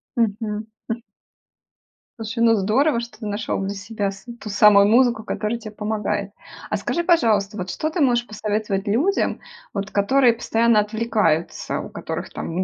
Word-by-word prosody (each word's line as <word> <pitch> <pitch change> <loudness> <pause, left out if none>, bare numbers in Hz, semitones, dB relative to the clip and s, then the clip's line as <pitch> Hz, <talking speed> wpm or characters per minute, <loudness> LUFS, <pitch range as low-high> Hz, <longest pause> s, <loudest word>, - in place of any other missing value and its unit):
Мгм, 225 -5 +2 0.5
хм. 230 +1 -3 1.2
Слушай, 225 +1 -2
ну 230 - +6
здорово, 235 +7 +2
что 235 -2 -8
ты 220 - -7
нашел 205 0 -2
для 195 +1 -2
себя 200 0 -3
с 195 +2 -13 0.2
ту 215 - -6
самую 200 -1 +6
музыку, 235 -1 +4
которая 215 +3 -2
те 215 -2 -9
помогает. 210 -1 -2 0.4
А - - 0
скажи, 345 - -1
пожалуйста, 215 - +3
вот 180 0 -4
что 310 - -2
ты 320 +1 -2
можешь 240 -3 +2
посоветовать 210 -1 -2
людям, 305 - +1 0.3
вот 200 0 -4
которые 240 +4 +4
постоянно 230 -1 +2
отвлекаются, 210 -6 0
у - - -6
которых, - - -5
там 175 +3 -3
215 Hz, 155 wpm, -22 LUFS, 205-235 Hz, 1.2 s, ну